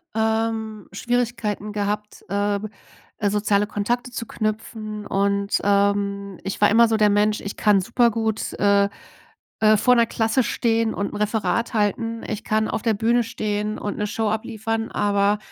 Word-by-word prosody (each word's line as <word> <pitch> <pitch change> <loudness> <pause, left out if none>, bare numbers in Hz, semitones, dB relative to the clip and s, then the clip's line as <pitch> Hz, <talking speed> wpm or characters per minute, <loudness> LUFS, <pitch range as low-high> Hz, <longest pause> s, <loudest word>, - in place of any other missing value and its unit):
ähm, 220 -1 -1
Schwierigkeiten 230 -2 -2
gehabt, 210 0 -3
äh, 205 +1 0 0.6
äh, 205 -2 +1
soziale 205 0 +1
Kontakte 240 +4 -2
zu 230 - -5
knüpfen. 215 -1 -4
Und, 200 +1 0
ähm, 200 -1 +1
ich 195 - -4
war 205 - +6
immer 230 +2 +6
so 220 -1 +1
der 210 -1 +4
Mensch, 210 +1 +2
ich 200 - -6
kann 205 -2 +4
super 235 +4 +3
gut, 220 -1 -2
äh, 200 0 +4 0.7
äh, 215 0 +6
vor 250 +4 +4
der 235 -1 +4
Klasse 225 +3 +1
stehen 225 -2 0
und 200 +3 -3
'n - - -4
Referat 215 +2 0
halten. 225 +2 -1
Ich 210 - -4
kann 215 0 +1
auf 220 - -2
der 225 -3 +2
Bühne 235 +3 +2
stehen 215 -2 -3
und 205 - -4
'ne 210 - -1
Show 215 +1 -1
abliefern, 225 +1 -3
aber 205 0 +2
215 Hz, 160 wpm, -23 LUFS, 205-225 Hz, 0.7 s, war